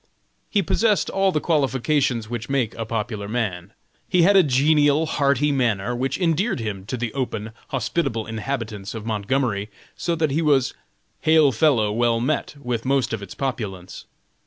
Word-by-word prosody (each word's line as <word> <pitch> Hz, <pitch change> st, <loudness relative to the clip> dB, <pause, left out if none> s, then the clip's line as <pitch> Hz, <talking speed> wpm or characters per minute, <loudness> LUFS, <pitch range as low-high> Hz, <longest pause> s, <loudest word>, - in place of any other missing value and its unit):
He 200 Hz, -2 st, +2 dB
possessed 210 Hz, +3 st, +1 dB
all 195 Hz, 0 st, +2 dB
the 150 Hz, -, 0 dB
qualifications 135 Hz, -6 st, +1 dB
which 120 Hz, +1 st, -5 dB
make 130 Hz, -5 st, 0 dB
a 115 Hz, -, -5 dB
popular 110 Hz, -2 st, -3 dB
man. 100 Hz, -5 st, -3 dB, 0.4 s
He 180 Hz, -2 st, +4 dB
had 200 Hz, +3 st, +5 dB
a 195 Hz, -, +8 dB
genial, 145 Hz, +1 st, +3 dB
hearty 145 Hz, -1 st, +1 dB
manner, 120 Hz, -4 st, 0 dB
which 130 Hz, +3 st, -1 dB
endeared 185 Hz, -, +1 dB
him 100 Hz, -4 st, -5 dB
to 130 Hz, -, -3 dB
the 120 Hz, -1 st, -3 dB
open, 115 Hz, -5 st, -3 dB, 0.2 s
hospitable 130 Hz, -3 st, -1 dB
inhabitants 110 Hz, -3 st, -4 dB
of 110 Hz, -1 st, -6 dB
Montgomery, 110 Hz, -1 st, -1 dB, 0.3 s
so 170 Hz, -, -1 dB
that 155 Hz, -3 st, 0 dB
he 155 Hz, +4 st, +1 dB
was 140 Hz, -6 st, +2 dB, 0.5 s
"hail 155 Hz, -3 st, +4 dB
fellow, 115 Hz, -4 st, +2 dB
well 115 Hz, +1 st, +1 dB
met," 145 Hz, +4 st, -1 dB
with 125 Hz, -4 st, -3 dB
most 130 Hz, -3 st, +1 dB
of 110 Hz, -, -3 dB
its 100 Hz, -, -9 dB
populace. 100 Hz, -9 st, -5 dB
125 Hz, 160 wpm, -23 LUFS, 110-150 Hz, 0.5 s, a